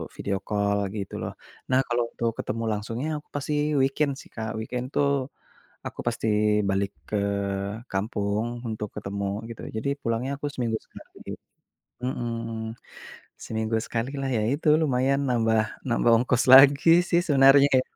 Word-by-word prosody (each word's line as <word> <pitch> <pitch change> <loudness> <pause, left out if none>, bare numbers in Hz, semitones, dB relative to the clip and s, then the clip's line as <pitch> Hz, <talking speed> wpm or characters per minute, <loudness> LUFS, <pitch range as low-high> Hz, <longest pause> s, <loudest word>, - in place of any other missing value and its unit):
video 100 -1 -2
call 100 -1 +1 0.2
gitu 100 -2 -5
loh. - - -4 0.4
Nah 130 - +5
kalau 120 0 +1
untuk 115 -1 -1
ketemu 115 +2 -3
langsungnya 115 +6 -3
aku 150 - -22
pasti 145 +1 -2 0.3
weekend 140 +2 +1
sih, - - -13
Kak. 110 -1 -4
Weekend 125 +3 -4
tuh, 140 -1 +1 0.6
aku - - -6
pasti 115 -1 -2 0.4
balik 95 0 0 0.2
ke 105 - -1 0.8
kampung 100 +1 -1 0.2
untuk 105 -1 -4
ketemu 100 +1 -4 0.2
gitu. 115 - -8
Jadi 110 +5 -2
pulangnya 115 +1 -1
aku 145 - -3
seminggu 115 -3 -1
sekali, - - -11 0.7
mhm. 115 -3 -4 0.7
Seminggu 110 0 -2
sekali 115 +3 -3
lah, 135 -1 -2
ya 110 - 0
itu 145 +2 -1
lumayan 135 -1 +2
nambah, 115 -3 +2 0.3
nambah 120 0 +2
ongkos 125 0 +1
lagi 140 +3 +8 0.2
sih 170 - +3
sebenarnya 135 -1 +6
ya. - - +2
115 Hz, 145 wpm, -26 LUFS, 110-135 Hz, 0.8 s, lagi